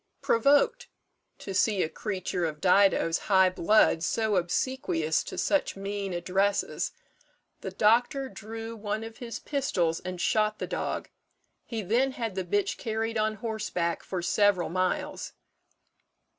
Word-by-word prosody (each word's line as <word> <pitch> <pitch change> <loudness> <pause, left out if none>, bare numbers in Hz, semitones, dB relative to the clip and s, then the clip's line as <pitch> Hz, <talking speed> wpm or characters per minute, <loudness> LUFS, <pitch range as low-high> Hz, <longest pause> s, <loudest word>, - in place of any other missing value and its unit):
Provoked 365 - +3 0.5
to 195 - -7
see 200 0 +2
a - - 0
creature 185 -1 -3
of 155 -2 -4
Dido's 185 -2 +4
high 190 -2 +5
blood 185 -2 +3
so 215 +4 0
obsequious 175 -3 0
to - - -7
such 295 - +1
mean 195 0 -4
addresses, 190 +3 0 0.7
the - - -5
doctor 245 +6 +2
drew 225 -1 -7
one 215 0 -3
of 225 0 -9
his 240 -3 -6
pistols 180 - -1
and 180 0 -6
shot 215 +2 +1
the - - -3
dog; - - -3 0.6
he 225 -3 -4
then 245 +8 +1
had 230 -5 -3
the 190 0 -2
bitch 200 +2 0
carried 225 0 -2
on 215 0 +1
horseback 210 -6 -2
for 180 -2 -4
several 200 0 +2
miles. 185 +2 -2
205 Hz, 135 wpm, -28 LUFS, 185-225 Hz, 0.7 s, high